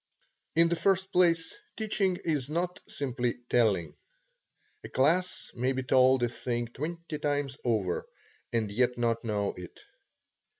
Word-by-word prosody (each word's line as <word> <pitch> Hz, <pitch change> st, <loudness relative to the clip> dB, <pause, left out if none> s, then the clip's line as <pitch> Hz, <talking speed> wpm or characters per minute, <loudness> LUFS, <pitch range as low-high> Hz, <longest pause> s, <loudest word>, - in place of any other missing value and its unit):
In 165 Hz, +1 st, +5 dB
the 170 Hz, -, +1 dB
first 190 Hz, +2 st, +1 dB
place, 170 Hz, -, +3 dB, 0.2 s
teaching 200 Hz, -4 st, 0 dB
is 150 Hz, -5 st, 0 dB
not 175 Hz, +3 st, -1 dB
simply 125 Hz, -3 st, -2 dB
telling. 100 Hz, -10 st, +2 dB, 0.9 s
A -, -, -7 dB
class 170 Hz, +7 st, +1 dB
may 125 Hz, +2 st, 0 dB
be 130 Hz, 0 st, -2 dB
told 130 Hz, 0 st, +4 dB
a -, -, +4 dB
thing 120 Hz, 0 st, -2 dB
twenty 155 Hz, +4 st, -5 dB
times 145 Hz, -2 st, -1 dB
over, 105 Hz, -7 st, 0 dB, 0.4 s
and 110 Hz, -3 st, 0 dB
yet 125 Hz, +3 st, +1 dB
not 115 Hz, -1 st, 0 dB
know 105 Hz, -3 st, -1 dB
it. 90 Hz, -1 st, -10 dB
130 Hz, 135 wpm, -29 LUFS, 120-165 Hz, 0.9 s, In